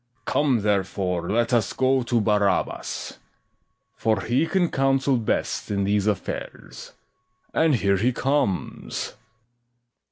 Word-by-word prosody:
SECOND 120 Hz, 0 st, -48 dB
JEW. -, -, -3 dB
Come, 140 Hz, -5 st, +3 dB
therefore, 95 Hz, -3 st, -1 dB
let 115 Hz, +3 st, +1 dB
us 115 Hz, -5 st, +2 dB
go 130 Hz, 0 st, +2 dB
to 120 Hz, -1 st, +1 dB
Barabas; 105 Hz, -2 st, -1 dB, 0.8 s
For 110 Hz, -3 st, 0 dB
he 120 Hz, -, +1 dB
can 180 Hz, -2 st, +1 dB
counsel 135 Hz, 0 st, +2 dB
best 115 Hz, -, -2 dB
in 100 Hz, -1 st, 0 dB
these 100 Hz, +1 st, +1 dB
affairs: 75 Hz, -, -5 dB, 0.6 s
And 160 Hz, -3 st, +3 dB
here 100 Hz, -4 st, +2 dB
he 120 Hz, +7 st, +2 dB
comes. 130 Hz, -6 st, -1 dB
BARABAS. -, -, -17 dB
115 Hz, 130 wpm, -24 LUFS, 100-130 Hz, 0.8 s, Come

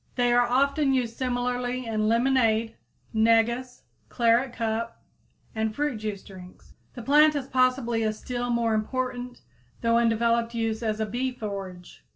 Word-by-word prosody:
They 245 Hz, -1 st, +2 dB
are 245 Hz, 0 st, +4 dB
often 275 Hz, +2 st, +2 dB
used 240 Hz, -3 st, -1 dB
similarly 250 Hz, 0 st, -2 dB
in 215 Hz, -1 st, -1 dB
lemonade, 230 Hz, -2 st, +2 dB, 0.4 s
negus, 230 Hz, +3 st, +1 dB, 0.3 s
claret 240 Hz, +2 st, +2 dB
cup 230 Hz, -1 st, -3 dB, 0.5 s
and 220 Hz, -1 st, -2 dB
fruit 295 Hz, -4 st, -1 dB
juice 210 Hz, -2 st, -5 dB
drinks. 185 Hz, -2 st, -14 dB, 0.2 s
The 240 Hz, -, -7 dB
plant 300 Hz, +4 st, +5 dB
has 275 Hz, -2 st, -3 dB
possibly 255 Hz, -3 st, +1 dB
a 215 Hz, -1 st, +1 dB
still 245 Hz, +3 st, -4 dB
more 235 Hz, -1 st, +1 dB
important 250 Hz, +2 st, -3 dB, 0.4 s
though 230 Hz, 0 st, +3 dB
undeveloped 235 Hz, 0 st, +1 dB
use 225 Hz, -1 st, -1 dB
as 215 Hz, -2 st, -2 dB
a 220 Hz, -, 0 dB
bee 245 Hz, +5 st, -2 dB
forage. 195 Hz, -6 st, -8 dB
235 Hz, 145 wpm, -26 LUFS, 220-255 Hz, 0.5 s, plant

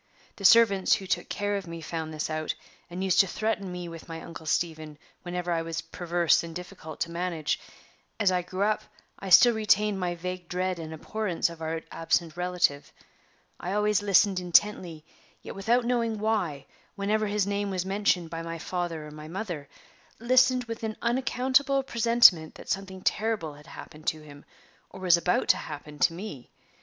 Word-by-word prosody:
The 195 Hz, -, -5 dB
servants 210 Hz, -3 st, +6 dB
who 195 Hz, -, -6 dB
took -, -, -1 dB
care 205 Hz, 0 st, -1 dB
of 195 Hz, -3 st, -7 dB
me 165 Hz, 0 st, -7 dB
found 160 Hz, 0 st, -5 dB
this 155 Hz, -1 st, -3 dB
out, 155 Hz, 0 st, -2 dB, 0.3 s
and 180 Hz, +2 st, -4 dB
used 190 Hz, -2 st, +2 dB
to 195 Hz, -, +6 dB
threaten 205 Hz, -1 st, -2 dB
me 180 Hz, -1 st, -5 dB
with 165 Hz, 0 st, -10 dB
my 165 Hz, 0 st, -5 dB
Uncle 165 Hz, -1 st, -10 dB
Stephen 155 Hz, -2 st, -2 dB, 0.2 s
whenever 175 Hz, 0 st, -3 dB
I 165 Hz, -1 st, +1 dB
was 165 Hz, 0 st, -4 dB
perverse 170 Hz, 0 st, +1 dB
and 165 Hz, -1 st, -8 dB
difficult 175 Hz, -3 st, -8 dB
to 170 Hz, -, -1 dB
manage. 170 Hz, -3 st, -2 dB, 0.6 s
As 205 Hz, -3 st, +4 dB
I 180 Hz, -1 st, +1 dB
grew 185 Hz, +2 st, -3 dB
up, 215 Hz, +1 st, +1 dB, 0.4 s
I 195 Hz, -, -6 dB
still 240 Hz, +6 st, +8 dB
retained 210 Hz, -2 st, +2 dB
my 175 Hz, -1 st, -1 dB
vague 180 Hz, +1 st, -6 dB
dread 185 Hz, 0 st, -1 dB
and 160 Hz, -1 st, -6 dB
abhorrence 175 Hz, +1 st, -2 dB
of 165 Hz, -1 st, -12 dB
our 160 Hz, 0 st, -3 dB
absent 165 Hz, 0 st, 0 dB
relative. 180 Hz, -5 st, 0 dB, 0.7 s
I 180 Hz, -, -3 dB
always 210 Hz, 0 st, +2 dB
listened 200 Hz, -1 st, +4 dB
intently, 175 Hz, -3 st, +2 dB, 0.4 s
yet -, -, -7 dB
without 235 Hz, +5 st, +1 dB
knowing 235 Hz, -2 st, 0 dB
why, 205 Hz, -10 st, -1 dB, 0.3 s
whenever 210 Hz, +2 st, 0 dB
his 205 Hz, -1 st, +1 dB
name 200 Hz, 0 st, -1 dB
was 185 Hz, -1 st, -2 dB
mentioned 190 Hz, -4 st, 0 dB
by 165 Hz, 0 st, -4 dB
my 165 Hz, 0 st, -5 dB
father 170 Hz, -2 st, -4 dB
or 150 Hz, -, -10 dB
my 150 Hz, 0 st, -10 dB
mother 170 Hz, -5 st, -5 dB, 0.5 s
listened 255 Hz, +1 st, +4 dB
with 230 Hz, -1 st, -7 dB
an 220 Hz, -1 st, -4 dB
unaccountable 265 Hz, +3 st, +2 dB
presentiment 230 Hz, -10 st, +5 dB
that -, -, -12 dB
something 190 Hz, -1 st, -3 dB
terrible 210 Hz, -8 st, 0 dB
had 150 Hz, +2 st, -16 dB
happened 155 Hz, -1 st, -11 dB
to 155 Hz, -, 0 dB
him, 145 Hz, -1 st, -13 dB, 0.4 s
or -, -, -11 dB
was 180 Hz, -2 st, +5 dB
about 180 Hz, +1 st, +1 dB
to -, -, +6 dB
happen 150 Hz, 0 st, -8 dB
to 165 Hz, -, +4 dB
me. 170 Hz, -, -8 dB
180 Hz, 180 wpm, -27 LUFS, 165-210 Hz, 0.7 s, still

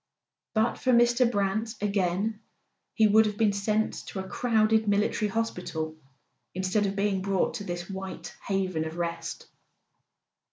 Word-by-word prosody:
But 220 Hz, +1 st, +1 dB
for 255 Hz, -, +2 dB
Mr. 240 Hz, +1 st, +4 dB
Brant, 210 Hz, +2 st, -1 dB
again, 200 Hz, +1 st, 0 dB, 0.6 s
he 220 Hz, -, +5 dB
would 215 Hz, +1 st, +6 dB
have 210 Hz, -1 st, -4 dB
been 210 Hz, -2 st, +3 dB
sent 215 Hz, +2 st, 0 dB
to 195 Hz, -, -5 dB
a 190 Hz, -, -5 dB
crowded 220 Hz, -1 st, +2 dB
military 205 Hz, +1 st, +1 dB
hospital 180 Hz, -8 st, -3 dB, 0.6 s
instead 190 Hz, +3 st, +1 dB
of 195 Hz, -, -3 dB
being 200 Hz, -1 st, +1 dB
brought 195 Hz, -1 st, 0 dB
to 205 Hz, -, -6 dB
this 175 Hz, -2 st, -5 dB
white 190 Hz, -1 st, -7 dB
heaven 185 Hz, -5 st, 0 dB
of 160 Hz, +1 st, -6 dB
rest. 170 Hz, -1 st, -4 dB
200 Hz, 145 wpm, -28 LUFS, 185-220 Hz, 0.6 s, would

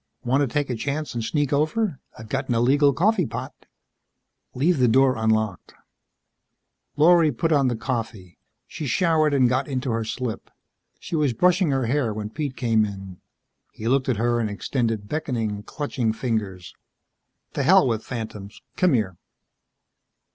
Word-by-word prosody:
"Want 130 Hz, +3 st, +2 dB
to 140 Hz, -, +2 dB
take 145 Hz, -3 st, -1 dB
a -, -, -1 dB
chance 145 Hz, +5 st, -3 dB
and 120 Hz, -1 st, -3 dB
sneak 145 Hz, +4 st, -1 dB
over? 155 Hz, -, 0 dB, 0.2 s
I've 110 Hz, -, -10 dB
got 135 Hz, +4 st, -3 dB
an 120 Hz, -, +1 dB
illegal 140 Hz, +5 st, +4 dB
coffee 180 Hz, -, +2 dB
pot." -, -, -6 dB, 1.0 s
"Leave 150 Hz, +4 st, +2 dB
the 125 Hz, -, +4 dB
door 130 Hz, +3 st, +4 dB
unlocked." 110 Hz, -3 st, -1 dB, 1.2 s
Lorry 160 Hz, +1 st, +5 dB
put 165 Hz, +6 st, -1 dB
on 140 Hz, -3 st, +3 dB
the 120 Hz, -, 0 dB
coffee. 110 Hz, -7 st, -5 dB, 0.3 s
She 155 Hz, +2 st, -6 dB
showered 160 Hz, +1 st, +2 dB
and 135 Hz, -3 st, +4 dB
got 130 Hz, +2 st, 0 dB
into 130 Hz, -2 st, -2 dB
her 115 Hz, 0 st, -1 dB
slip. 115 Hz, 0 st, -5 dB, 0.5 s
She -, -, -5 dB
was 150 Hz, -5 st, +1 dB
brushing 180 Hz, -, +3 dB
her 135 Hz, -2 st, 0 dB
hair 120 Hz, -3 st, 0 dB
when 105 Hz, 0 st, -5 dB
Pete 140 Hz, +1 st, -4 dB
came 115 Hz, -3 st, +2 dB
in. 95 Hz, -3 st, -7 dB, 0.5 s
He 110 Hz, -, -6 dB
looked 130 Hz, +2 st, +1 dB
at 125 Hz, -, +1 dB
her 120 Hz, +1 st, +1 dB
and 110 Hz, -2 st, -1 dB
extended 110 Hz, 0 st, -2 dB
beckoning, 115 Hz, -8 st, -2 dB
clutching 120 Hz, -2 st, -2 dB
fingers. 105 Hz, -7 st, -3 dB, 0.8 s
"The -, -, -1 dB
hell -, -, +5 dB
with 115 Hz, -2 st, -1 dB
phantoms. 110 Hz, -4 st, -7 dB, 0.2 s
Come 180 Hz, -5 st, +3 dB
here." 100 Hz, -8 st, 0 dB
125 Hz, 160 wpm, -24 LUFS, 110-145 Hz, 1.2 s, Lorry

